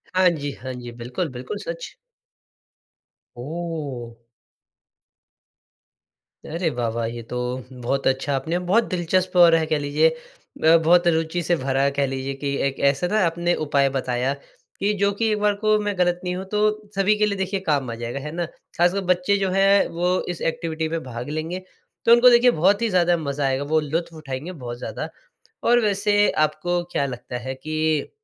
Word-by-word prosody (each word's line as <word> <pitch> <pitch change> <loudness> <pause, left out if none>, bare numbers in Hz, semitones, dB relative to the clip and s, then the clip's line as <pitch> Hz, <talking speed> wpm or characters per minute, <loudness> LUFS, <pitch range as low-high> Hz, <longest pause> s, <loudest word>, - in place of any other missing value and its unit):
हाँ 185 -1 +5
जी, 145 -4 -3
हाँ 130 -1 -7
जी, 120 -1 -8
बिल्कुल, 125 +8 -4
बिल्कुल 130 +10 -6
सच। - - -6 1.4
ओह! 145 -4 -5 2.3
अरे! 165 +1 -2
वाह, 120 -5 -2
वाह! 115 -1 -1
ये 120 +1 -6
तो 125 - -3 0.3
बहुत 130 +2 -2
अच्छा 135 +2 0
आपने 160 +6 -1
बहुत 230 +3 +5
दिलचस्प 180 +1 0
और 170 -2 +8
है 160 -1 +2
कह 155 -1 0
लीजिए 145 +3 +3 0.5
ब 160 +1 +7
बहुत 175 0 +5
रुचि 165 +1 +1
से 175 +2 +2
भरा 135 -2 -1
है, 140 - +2
कह 140 0 0
लीजिए 135 +1 -3
कि 140 -1 0
एक 135 - -5
ऐसा 140 +6 -1
ना 215 - +3
आपने 170 +1 0
उपाय 140 -2 +2
बताया 125 +1 0 0.5
कि 205 +2 +1
जो 200 0 +4
कि 225 - +2
एक 210 - 0
बार 210 0 +3
को 215 0 +4
मैं 205 -2 -2
गलत 175 -1 +2
नहीं 180 0 -2
हूँ, 190 +1 -5
तो 210 +1 0
सभी 195 +2 +3
के 210 - +3
लिए 200 -2 -1
देखिए 190 +1 -1
काम 140 -5 +1
आ 115 - -4
जाएगा 120 +3 -3
है 150 +2 -6
ना? 170 +1 -2 0.3
खासकर 175 +3 +3
बच्चे 180 +3 0
जो 195 -1 0
हैं 195 +1 +4
वो 180 +2 0
इस 175 - -5
एक्टिविटी 160 -1 -3
में 165 0 -2
भाग 120 0 -6
लेंगे, 160 +4 -3 0.5
तो 230 - +5
उनको 240 +1 +8
देखिए 245 +1 +6
बहुत 200 +5 +4
ही 230 - +1 0.3
मज़ा 140 -3 -2
आएगा, 135 +1 0
वो 155 +2 +2
लुत्फ़ 165 +3 -3
उठाएँगे 150 +2 -6
बहुत 125 -8 -7
ज़्यादा - - -5 0.6
और 240 +1 +5
वैसे 205 -1 +2
आपको 175 +3 0
क्या 140 - +1
लगता 125 -1 -6
है 130 +2 -5
कि 155 +2 -1
160 Hz, 185 wpm, -23 LUFS, 135-185 Hz, 2.3 s, और